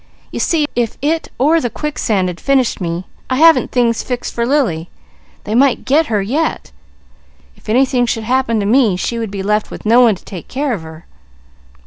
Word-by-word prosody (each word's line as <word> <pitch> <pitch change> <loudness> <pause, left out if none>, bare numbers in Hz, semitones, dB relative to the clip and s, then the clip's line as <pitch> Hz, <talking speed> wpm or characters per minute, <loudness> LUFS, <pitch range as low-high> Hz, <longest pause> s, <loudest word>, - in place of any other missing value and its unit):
"You - - -5
see 315 -3 +1
if 235 -2 -1
it 320 +2 0
or 315 +5 +3
the 245 - -1
quicksands 225 -7 -1
had 180 -1 -5
finished 265 -6 +1
me, 170 +1 -3 0.2
I 255 - +1
haven't 325 +3 +5
things 235 -2 +1
fixed 250 -1 -4
for 235 0 -1
Lily. 210 - 0 0.5
They 210 - -4
might 260 +2 +2
'get' 295 +4 +2
her 210 -3 0
yet. 290 - -2 0.8
If - - -15
anything 250 +1 +2
should 225 -1 -2
happen 245 -1 0
to - - -2
me, 225 -2 +3
she 235 +5 -3
would 225 -2 -3
be 195 -1 -5
left 210 +1 0
with - - -10
no 235 +3 +5
one 230 -4 +4
to - - -18
take 180 -4 -9
care 275 -1 -2
of 200 - -4
her." 160 +1 -12
235 Hz, 195 wpm, -16 LUFS, 205-270 Hz, 0.8 s, haven't